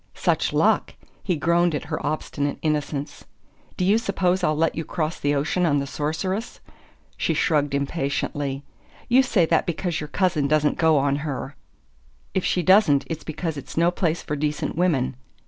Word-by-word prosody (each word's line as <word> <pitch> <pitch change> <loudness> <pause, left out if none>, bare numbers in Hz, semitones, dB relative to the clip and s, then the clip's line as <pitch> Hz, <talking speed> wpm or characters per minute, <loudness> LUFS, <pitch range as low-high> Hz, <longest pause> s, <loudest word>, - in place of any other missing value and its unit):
"Such - - +1
luck?" - - +2 0.3
He 180 - 0
groaned 170 +1 +2
at - - -3
her - - -4
obstinate 145 -1 -2
innocence. 150 -2 -2 0.5
"Do 180 - 0
you 205 +4 +4
suppose 190 -4 0
I'll 155 -3 +2
let 165 +1 +2
you 160 - -3
cross 160 0 -3
the 145 0 +1
ocean 155 +6 0
on 150 -4 +3
the 140 - -1
Sorceress?" 160 - -3 0.6
She - - 0
shrugged 145 -4 +1
impatiently. 140 -1 -2 0.5
"You 250 +2 +6
say 210 -9 +2
that 165 0 +1
because 170 -1 -2
your 150 - -5
cousin 175 -6 +1
doesn't 150 0 +1
go 160 -2 +4
on 140 0 +2
her." 145 -1 -5 0.8
"If 190 - 0
she 180 - +1
doesn't, 185 -8 +5
it's 160 -2 -4
because 160 0 -4
it's 140 - -9
no 170 +1 +4
place 170 -2 -1
for 150 - -3
decent 150 +1 -2
women." 145 -8 +1
155 Hz, 170 wpm, -24 LUFS, 145-175 Hz, 0.8 s, You